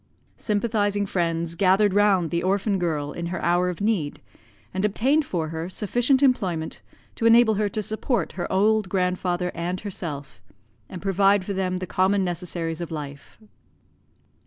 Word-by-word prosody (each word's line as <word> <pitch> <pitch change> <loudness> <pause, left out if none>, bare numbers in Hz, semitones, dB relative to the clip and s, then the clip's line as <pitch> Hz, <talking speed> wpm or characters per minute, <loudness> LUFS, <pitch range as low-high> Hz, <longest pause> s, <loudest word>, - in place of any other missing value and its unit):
Sympathizing 205 -1 0
friends 170 -3 -1
gathered 190 +2 +3
round 195 -5 +3
the 170 0 0
orphan 195 +1 0
girl 150 -4 -1
in 170 +2 -5
her 175 +1 -3
hour 175 +1 +2
of 180 +2 -6
need, 170 -9 0 0.5
and 190 +1 -2
obtained 260 +9 +2
for 165 -9 -2
her 165 +2 -4
sufficient 245 +8 +1
employment 185 -12 0 0.3
to 230 - +1
enable 230 -1 +6
her 210 0 0
to 215 +2 -3
support 220 +4 -1
her 175 - -5
old 210 +1 +2
grandfather 180 -1 0
and 175 +2 -3
herself, 150 - -6 0.5
and 180 - -8
provide 195 0 +3
for 200 - -3
them 185 -1 -1
the 185 - -4
common 190 +2 +1
necessaries 175 -2 -3
of 170 - -4
life. 145 -3 -8
185 Hz, 155 wpm, -24 LUFS, 170-205 Hz, 0.5 s, enable